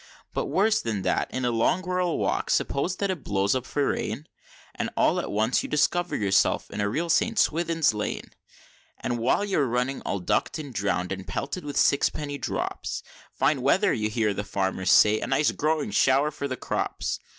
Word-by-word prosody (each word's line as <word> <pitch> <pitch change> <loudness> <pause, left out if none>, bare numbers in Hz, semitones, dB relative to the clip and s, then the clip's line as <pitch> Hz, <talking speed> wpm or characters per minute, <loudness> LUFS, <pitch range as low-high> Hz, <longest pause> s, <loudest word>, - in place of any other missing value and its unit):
But - - -1
worse 215 +3 +2
than 110 -4 -3
that, - - 0
in 130 -1 -3
a 120 - +1
long 115 +10 +1
rural 180 -1 0
walk, - - -1
suppose 175 +7 0
that 200 0 -1
it 180 -6 -5
blows 100 0 +1
up 130 -1 -2
for 145 -1 0
rain, 150 - -3 0.5
And - - -3
all - - +3
at - - -4
once 110 +4 +1
you - - -6
discover 175 +4 +1
yourself 100 -1 +1
in 105 - -3
a 100 - +1
real 160 +10 -1
St. 225 +7 +2
Swithin's 165 - +2
Lane; 105 0 -4 0.7
And 120 -1 -2
while 130 - +2
you're 155 -9 +1
running 125 +3 -1
all - - -2
ducked 90 - 0
and 145 -4 -7
drown'd, 95 -4 -1
and 95 -1 -5
pelted 140 - -4
with 145 -1 -5
sixpenny 145 0 +1
drops, - - -3 0.3
"Fine - - +1
weather," - - +3
you 105 0 -1
hear 110 -2 0
the 105 - -3
farmers 95 -2 -1
say; 105 +2 +6
"a - - -3
nice 150 - +2
growing 155 -6 -1
show'r 135 +7 +3
for 140 -1 -4
the 130 -2 -4
crops!" - - -2
130 Hz, 195 wpm, -26 LUFS, 105-155 Hz, 0.7 s, say